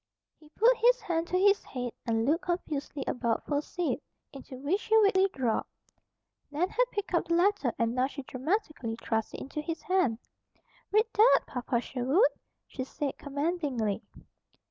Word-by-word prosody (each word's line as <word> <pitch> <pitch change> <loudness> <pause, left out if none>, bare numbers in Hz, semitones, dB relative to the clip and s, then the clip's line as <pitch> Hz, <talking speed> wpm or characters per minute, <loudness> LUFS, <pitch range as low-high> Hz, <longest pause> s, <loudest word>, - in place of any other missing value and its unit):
He 305 - -19
put 465 +9 +4
his - - +4
hand 340 -6 -2
to 365 - 0
his 400 +2 +4
head 250 -2 -5 0.2
and 225 0 +1
looked 315 +6 +1
confusedly 305 -5 -3
about 235 -2 -1
for 290 - 0
a - - +1
seat, 350 +2 -2 0.3
into 270 -1 -9
which 305 +11 -1
he 445 - +4
weakly 395 -2 +4
dropped. 245 -4 -1 0.8
Nan 320 +6 0
had - - +2
picked 410 -4 -4
up 345 - +2
the 335 - +2
letter 355 - +2
and 230 0 +1
now 255 +1 +2
she 275 0 -8
dramatically 270 - -2
thrust 225 -1 -2
it - - -7
into 300 +3 -5
his 325 +1 -5
hand. 365 -12 +2 0.7
"Read 430 +2 +4
that, 440 +4 +6
Papa 245 -2 -2
Sherwood!" 265 - +2 0.4
she 260 - -5
said 275 +1 -4
commandingly. 285 - -1
300 Hz, 165 wpm, -29 LUFS, 255-380 Hz, 0.8 s, that